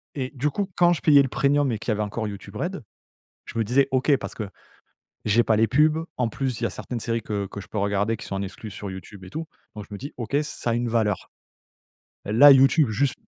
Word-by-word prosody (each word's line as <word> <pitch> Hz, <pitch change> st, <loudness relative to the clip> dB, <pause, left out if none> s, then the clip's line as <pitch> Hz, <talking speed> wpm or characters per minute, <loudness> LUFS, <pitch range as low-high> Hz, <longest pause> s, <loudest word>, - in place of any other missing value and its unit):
Et 130 Hz, 0 st, -3 dB
du 145 Hz, +4 st, 0 dB
coup, 200 Hz, +6 st, -2 dB
quand 175 Hz, 0 st, +5 dB
je -, -, -4 dB
payais 145 Hz, -3 st, +6 dB
le 135 Hz, -, +1 dB
Premium, 140 Hz, -1 st, +2 dB
et 110 Hz, -, -2 dB
qu'il 110 Hz, -, -2 dB
y -, -, +3 dB
avait 105 Hz, -, -2 dB
encore 105 Hz, +1 st, -3 dB
YouTube 100 Hz, -1 st, -9 dB
Red, -, -, -4 dB, 0.6 s
je 115 Hz, -, -7 dB
me 115 Hz, -, +2 dB
disais: 135 Hz, +5 st, +3 dB
«OK, 135 Hz, +2 st, +3 dB
parce -, -, -7 dB
que 105 Hz, -3 st, -5 dB, 0.8 s
j'ai 110 Hz, +3 st, +4 dB
pas 110 Hz, -, +2 dB
les 110 Hz, +1 st, +3 dB
pubs». 155 Hz, +4 st, +3 dB
En 125 Hz, -2 st, +1 dB
plus, 130 Hz, 0 st, -3 dB
il -, -, -1 dB
y -, -, +3 dB
a -, -, -3 dB
certaines 120 Hz, -2 st, -5 dB
séries 115 Hz, 0 st, -2 dB
que 100 Hz, -2 st, -3 dB
que 100 Hz, +1 st, -8 dB
je -, -, -12 dB
peux 105 Hz, -, -4 dB
regarder, 100 Hz, +2 st, 0 dB
qui -, -, -9 dB
sont 95 Hz, -, -5 dB
en 95 Hz, -, -2 dB
exclu 105 Hz, +2 st, -7 dB
sur 100 Hz, 0 st, -7 dB
YouTube 95 Hz, +1 st, -10 dB
et 90 Hz, -, -11 dB
tout, 160 Hz, 0 st, -5 dB, 0.3 s
donc 105 Hz, -, -7 dB
je 105 Hz, -, -8 dB
me -, -, -6 dB
dis: 140 Hz, +4 st, -7 dB
«OK, 120 Hz, +3 st, -2 dB
ça 125 Hz, -5 st, -4 dB
a -, -, +1 dB
une 120 Hz, 0 st, -1 dB
valeur. 110 Hz, -3 st, 0 dB, 1.0 s
Là, 130 Hz, +8 st, +8 dB
YouTube, 135 Hz, 0 st, +5 dB
juste» 130 Hz, +5 st, 0 dB
115 Hz, 255 wpm, -24 LUFS, 105-140 Hz, 1.0 s, Là